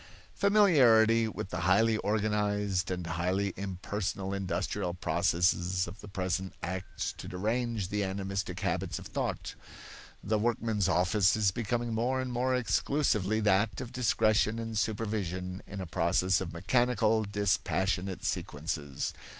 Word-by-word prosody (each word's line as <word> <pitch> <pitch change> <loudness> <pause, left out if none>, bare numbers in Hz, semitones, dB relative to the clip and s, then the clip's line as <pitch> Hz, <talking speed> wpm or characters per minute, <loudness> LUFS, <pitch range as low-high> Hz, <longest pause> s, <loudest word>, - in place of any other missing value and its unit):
Familiarity 125 - +5
with 105 - -5
the 90 - -3
highly 110 +6 +3
organized 105 -3 0
and 90 -2 -3
highly 90 +3 -1
impersonal 95 0 -3
industrial 95 -1 -2
processes 90 +1 +1
of 95 +5 -10
the 105 - -10
present 95 -1 -3
acts 95 +2 -4
to - - -7
derange 110 +1 -2
the 105 0 -1
animistic 95 -1 -3
habits 95 -1 -1
of - - -8
thought. - - -3 0.7
The 110 +1 +1
workman's 110 -3 0
office 95 +2 +3
is 105 -3 +2
becoming 120 +3 -2
more 125 +4 0
and 130 -1 -3
more 130 +2 +1
exclusively 110 -4 +1
that 105 +1 +2
of 125 -1 -7
discretion 110 -3 +2
and 115 -1 -4
supervision 100 -4 -2
in 100 - -7
a 95 - -4
process 90 +3 +1
of 90 -2 -4
mechanical, 110 +4 +2
dispassionate 95 -2 -1
sequences. 75 -2 -3
100 Hz, 130 wpm, -30 LUFS, 90-110 Hz, 0.7 s, Familiarity